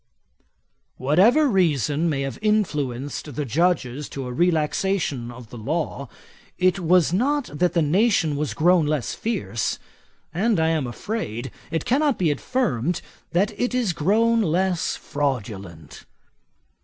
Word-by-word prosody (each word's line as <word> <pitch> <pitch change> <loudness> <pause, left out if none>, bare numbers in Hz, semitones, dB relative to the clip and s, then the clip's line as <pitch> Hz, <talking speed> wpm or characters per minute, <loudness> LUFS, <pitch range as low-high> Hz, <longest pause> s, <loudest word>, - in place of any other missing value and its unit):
'Whatever 195 - +4
reason 165 - +1
may 140 -3 -1
have 135 -3 -4
influenced 145 - -1
the 150 - -2
Judges 150 -1 0
to 135 -2 -6
a 125 - -5
relaxation 160 -3 0
of 120 -2 -11
the 120 - -8
law, 140 +1 -3 0.5
it 185 +1 +2
was 175 -1 +3
not 275 +7 0
that 175 +4 +1
the 170 - +2
nation 170 -1 +2
was 140 -6 -2
grown 170 -1 +4
less 150 -4 -1
fierce; 205 - -2 0.6
and, 205 +3 +1
I 160 0 +2
am 155 -5 0
afraid, 120 - -4 0.2
it 165 - -2
cannot 285 +1 +2
be 170 -5 +2
affirmed, 175 - -1 0.3
that 190 +4 +2
it 245 0 0
is 235 -8 +1
grown 225 +8 +2
less 180 -1 0
fraudulent. 100 - -4
160 Hz, 130 wpm, -23 LUFS, 135-195 Hz, 0.6 s, Whatever